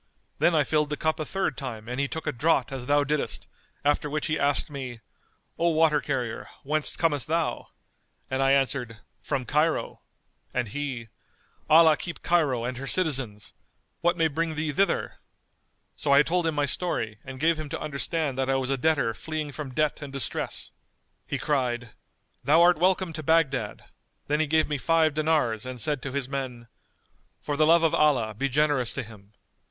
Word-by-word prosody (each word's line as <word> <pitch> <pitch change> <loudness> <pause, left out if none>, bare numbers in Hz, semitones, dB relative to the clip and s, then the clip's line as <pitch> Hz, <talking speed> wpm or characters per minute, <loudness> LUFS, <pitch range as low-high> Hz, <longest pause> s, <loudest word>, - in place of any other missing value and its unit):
Then 175 - +4
I 150 - +4
filled 150 +1 +1
the 150 - -2
cup 160 0 0
a 155 - -2
third 190 -6 -1
time 115 -6 -6
and 125 +2 -4
he 140 - +1
took 160 +3 -6
a - - 0
draught 135 -1 +1
as 130 -2 -5
thou 145 0 +4
diddest; 150 +1 -2 0.4
after 145 +1 +2
which 155 +1 -2
he 155 -2 -1
asked 140 0 +1
me, 130 -4 -6 0.6
'O 170 +1 +3
water 155 -2 +3
carrier, 125 -5 -3
whence 150 +2 +1
comest 145 -7 0
thou?' 165 +1 -1 0.6
And 130 +1 -1
I 135 0 +4
answered, 130 -4 0 0.2
'From 135 -4 -2
Cairo,' 150 +6 0 0.5
and 120 - 0
he, 130 -3 -4 0.6
'Allah 160 0 +7
keep 175 - -6
Cairo 145 -9 +2
and 125 0 -3
her 135 - -6
citizens! 135 - 0 0.5
What 175 +1 +1
may 165 -1 +3
bring 160 +1 -2
thee 155 0 -1
thither?' 195 +7 0 0.8
So 145 - -1
I 140 +1 +7
told 170 +1 0
him 160 - -1
my 145 -1 +2
story 135 -8 -2
and 130 0 -9
gave 160 +1 +2
him 155 -2 -5
to - - -4
understand 150 -1 -2
that 135 0 0
I 135 - +3
was 135 0 -1
a 135 - 0
debtor 140 -6 +2
fleeing 155 +2 -4
from 140 -1 -6
debt 155 +3 0
and 140 -2 -7
distress. 135 -5 -3 0.6
He - - -2
cried, 125 -5 -1 0.5
'Thou 155 +3 +5
art 175 -1 +5
welcome 185 -1 +2
to 155 - -5
Baghdad'; 140 -8 +1 0.4
then 150 +1 0
he 155 - +1
gave 155 +1 +3
me 150 -2 -2
five 160 0 +3
dinars 150 -8 +1
and 130 -1 -6
said 145 +2 0
to 140 - -5
his 140 -1 -1
men, 130 -4 -5 0.7
'For 145 - -3
the 155 +1 +3
love 165 +1 +5
of 165 - +3
Allah 130 -8 +3
be 135 +6 -1
generous 145 -3 +2
to 135 - -3
him. 105 -2 -15
145 Hz, 190 wpm, -26 LUFS, 130-155 Hz, 0.8 s, Allah